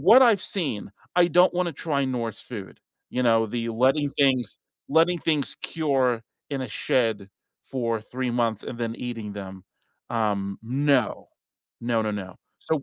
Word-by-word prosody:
what 220 - +8
I've 225 -6 +5
seen, 140 - 0 0.3
I 175 -1 +6
don't 180 +2 +5
wanna 180 -1 +1
try 140 -1 -1
Norse 115 -4 -3
food, 105 -6 -9 0.3
you 125 - -1
know, 115 -2 +4
the 115 +1 -3
letting 130 +6 +2
things 130 -6 +1 0.3
letting 165 +3 +3
things 150 -4 +1
cure 135 -7 0 0.3
in 135 -2 -2
a 125 - -5
shed 110 -3 0 0.3
for 115 -4 -2
3 125 +3 -3
months 115 -3 0
and 120 - -6
then 115 -1 -2
eating 115 -4 -5
them. 95 -2 -8 0.5
Um, 100 -4 -1
no. 130 0 +1 0.5
No, 115 -1 +1
no, 110 - -1
no. 95 -3 -6 0.2
So, 155 -3 -1
125 Hz, 155 wpm, -25 LUFS, 110-145 Hz, 0.5 s, what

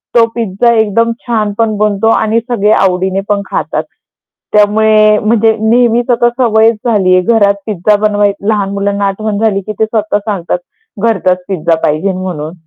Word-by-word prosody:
तो 230 - +5
पिझ्झा 235 +1 0
एकदम 225 +1 +1 0.2
छान 215 -3 0
पण 225 -2 0
बनतो 210 0 0
आणि 220 0 +1
सगळे 210 -3 +1
आवडीने 190 -1 +1
पण 205 -1 +1
खातात. - - -2 0.7
त्यामुळे 215 0 +3
म्हणजे 220 0 +2
नेहमीच 235 +2 +2
आता 240 0 +3
सवयच 225 -2 +3
झालीये 185 -4 +3
घरात 205 -1 +2
पिझ्झा 210 0 +1
बनवायची. 205 -1 -1
लहान 205 -3 0
मुलांना 200 0 -1
आठवण 205 +1 -3
झाली 215 -2 0
की 215 - -4
ते 220 - +4
स्वतः 215 -2 -1
सांगतात 195 - -2 0.4
घरचाच 185 -5 0
पिझ्झा 170 -3 0
पाहिजे 155 +6 0
म्हणून. 175 -4 -5
210 Hz, 150 wpm, -11 LUFS, 195-225 Hz, 0.7 s, तो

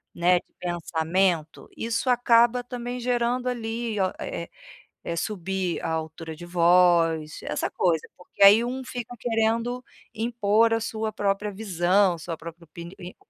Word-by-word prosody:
né, 175 +1 +4
de - - -26
pensamento, 170 -1 -1
isso 230 +3 -1
acaba 240 0 +4
também 245 0 -5
gerando 245 +1 0
ali, 225 -2 -3
o 190 - +3
eh 170 - -4
eh - - -12 0.6
eh, 170 - -3
subir 190 -1 -2
a - - -3
altura 160 0 -5
de 175 - -10
voz, 170 -3 +3
essa - - -2
coisa. 165 -4 0
Porque 180 +2 -7
aí 205 +4 +8
um 260 +2 -4
fica 245 -1 -6
querendo 230 +2 0 0.3
impor 225 0 +2
a - - +2
sua 220 0 -3
própria 205 0 -1
visão, 190 -2 +1
sua 165 0 -5
própria 170 +1 -10
opi 170 +2 -10
ni 180 +1 -10
200 Hz, 150 wpm, -25 LUFS, 170-230 Hz, 0.6 s, aí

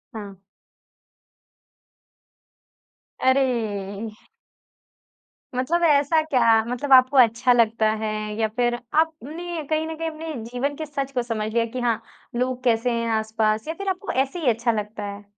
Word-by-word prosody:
हाँ। 200 -3 -8 2.8
अरे! 260 +1 +3 2.1
मतलब 325 +8 0
ऐसा 295 +2 +4
क्या? 235 -7 +3
मतलब 250 +3 0
आपको 260 +1 +6
अच्छा 245 +1 +5
लगता 225 -2 +3
है 215 - -1 0.3
या 220 - +2
फिर 240 -1 +2 0.3
आपने 320 +2 -3
कहीं 310 0 +1
न 320 - -5
कहीं 325 0 -2
अपने 320 0 -6
जीवन 250 +5 -3
के 315 - -5
सच 275 -2 -4
को 255 -2 0
समझ 220 -2 -3
लिया 230 -1 +2
कि 250 +2 -6
हाँ, 235 -2 0 0.3
लोग 250 +1 -1
कैसे 240 0 +2
हैं 230 0 -1
आस-पास 220 +2 -1
या 320 - -2
फिर 395 +2 -4
आपको 380 +1 -3
ऐसे 270 +6 -1
ही 300 -7 +2
अच्छा 235 +1 +1
लगता 210 -1 -4
है? 200 0 -6
250 Hz, 145 wpm, -23 LUFS, 225-305 Hz, 2.8 s, आपको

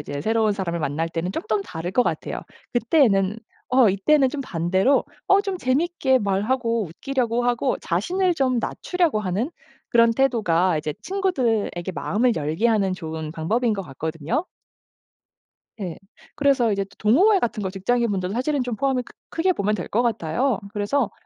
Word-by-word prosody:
이제 145 -1 -5
새로운 220 +3 +2
사람을 175 -4 -3
만날 155 +3 -1
때는 170 +3 -3
조금 210 0 -1
다를 170 -1 -5
것 250 - +4
같아요. - - -3 0.3
그때에는 225 -5 +3 0.3
어 250 -4 +6
이때는 265 +9 +3
좀 285 - -4
반대로 190 +5 +1 0.2
어 390 +1 +6
좀 390 -2 -3
재미있게 265 -1 +1
말하고 230 +3 0
웃기려고 240 +6 -1
하고 245 +2 +1
자신을 355 - 0
좀 260 -5 +1
낮추려고 340 - 0
하는 210 - -1 0.4
그런 230 -1 +5
태도가 185 - +2
이제 150 0 -3
친구들에게 235 - -1
마음을 235 +8 +1
열게 160 +9 0
하는 200 -4 +2
좋은 160 -3 -6
방법인 220 +9 0
것 195 -2 -3
같거든요. 160 - -3 1.3
네. 180 -5 -5 0.4
그래서 275 -6 +3
이제 195 -1 0
또 195 - -21
동호회 370 - +4
같은 220 - -2
거 190 - -1
직장인 230 +4 0
분들도 185 -1 -2
사실은 260 +3 0
좀 245 -3 -3
포함이 265 -1 0
크 - - -16 0.2
크게 365 +3 +1
보면 210 - 0
될 180 - -4
것 235 +4 +1
같아요. 235 - 0
그래서 215 +4 0
225 Hz, 355 characters per minute, -23 LUFS, 185-260 Hz, 1.3 s, 어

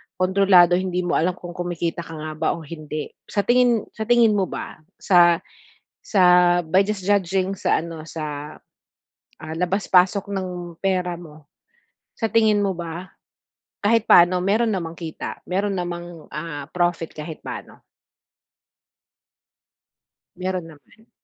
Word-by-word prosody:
kontrolado, 185 -1 +5
hindi 180 -1 -1
mo 175 - 0
alam 180 +3 +1
kung 175 -1 -9
kumikita 175 -1 -3
ka 165 - -10
nga 155 0 -6
ba - - -1
o 170 - -9
hindi. 155 -1 -6 0.2
Sa 205 - 0
tingin 240 -2 +3
sa 220 - -5
tingin 235 -3 +5
mo 195 - +2
ba, - - -7 0.2
sa 175 -3 +5 0.6
sa 195 -4 +2 0.4
by 185 +5 +4
just 210 -2 -3
judging 195 -1 +1
sa - - +1
ano, 165 -1 -7
sa, 150 -2 -6 0.9
ah, 160 0 -6
labas-pasok 190 +2 +2
ng 180 -3 -5
pera 180 -2 -1
mo. 155 -3 -14 0.7
Sa 225 - -1
tingin 215 -1 +3
mo 195 -3 -1
ba, 170 +2 -6 0.7
kahit 225 +1 +3
paano 175 +1 +6
meron 220 +4 +2
namang 165 -4 -3
kita? 160 -2 -6
Meron 195 +2 0
namang, 175 -2 -6
ah, 150 -2 -5
profit 175 -2 0
kahit 155 +1 -7
paano? - - -8 2.5
Meron 185 -1 -3
naman. 190 +9 -20
180 Hz, 135 wpm, -22 LUFS, 165-195 Hz, 2.5 s, paano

